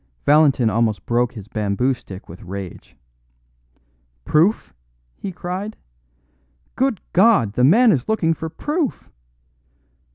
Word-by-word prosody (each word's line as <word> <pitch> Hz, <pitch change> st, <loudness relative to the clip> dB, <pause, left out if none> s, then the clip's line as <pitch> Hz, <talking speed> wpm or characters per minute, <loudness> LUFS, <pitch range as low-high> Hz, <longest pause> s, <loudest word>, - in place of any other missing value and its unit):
Valentin 145 Hz, -5 st, +4 dB
almost 110 Hz, -4 st, 0 dB
broke 120 Hz, +1 st, 0 dB
his 105 Hz, -5 st, -10 dB
bamboo 110 Hz, +3 st, 0 dB
stick 95 Hz, -6 st, -11 dB
with 85 Hz, -, -12 dB
rage. 95 Hz, -1 st, -8 dB, 1.3 s
"Proof!" 160 Hz, -, +2 dB, 0.4 s
he 195 Hz, -, -6 dB
cried. 185 Hz, +4 st, -5 dB, 1.0 s
"Good 265 Hz, -6 st, 0 dB
God! 185 Hz, -, +4 dB
the 125 Hz, -, +1 dB
man 220 Hz, -, +6 dB
is 130 Hz, -, -1 dB
looking 170 Hz, -7 st, +2 dB
for 160 Hz, 0 st, -6 dB
proof! 295 Hz, -, -3 dB
135 Hz, 110 wpm, -20 LUFS, -, 1.3 s, man